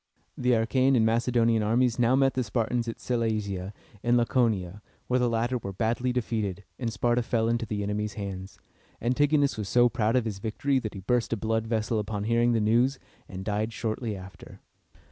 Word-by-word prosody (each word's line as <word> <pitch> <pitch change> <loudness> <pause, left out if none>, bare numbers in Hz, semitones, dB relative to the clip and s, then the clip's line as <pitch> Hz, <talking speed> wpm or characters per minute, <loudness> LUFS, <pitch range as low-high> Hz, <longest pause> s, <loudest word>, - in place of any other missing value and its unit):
The 125 0 +1
Achæan 130 +4 +3
and 110 - +3
Macedonian 115 0 +2
armies 120 +3 +2
now 120 +2 +4
met 135 0 +3
the 130 - 0
Spartans 115 +1 -1
at 115 - -5
Sel 125 -1 -1
la´sia, 100 -4 -2 0.3
in 120 0 +3
Laconia, 110 -6 +1 0.2
where 125 0 +1
the 125 -1 +2
latter 120 +2 0
were 100 -3 -6
badly 115 +5 0
defeated, 110 -5 -2 0.2
and 120 -3 -2
Sparta 120 +4 +1
fell 115 -1 0
into 115 0 0
the 105 -1 -2
enemy's 105 +1 -2
hands. 100 -2 -6 0.4
Antigonus 140 +2 +2
was 100 -2 -4
so 120 0 +5
proud 115 -1 0
of 125 -3 +2
his 105 -3 -4
victory 130 +6 0
that 110 -4 -6
he 95 - -7
burst 120 +4 0
a - - -1
blood 110 +2 -1
vessel 110 0 0
upon 105 -1 -3
hearing 115 +2 +2
the 115 - +2
news, 120 +6 +2 0.3
and 95 0 -7
died 110 +1 -1
shortly 110 0 -3
after. 95 -1 -12
115 Hz, 190 wpm, -27 LUFS, 105-120 Hz, 0.4 s, so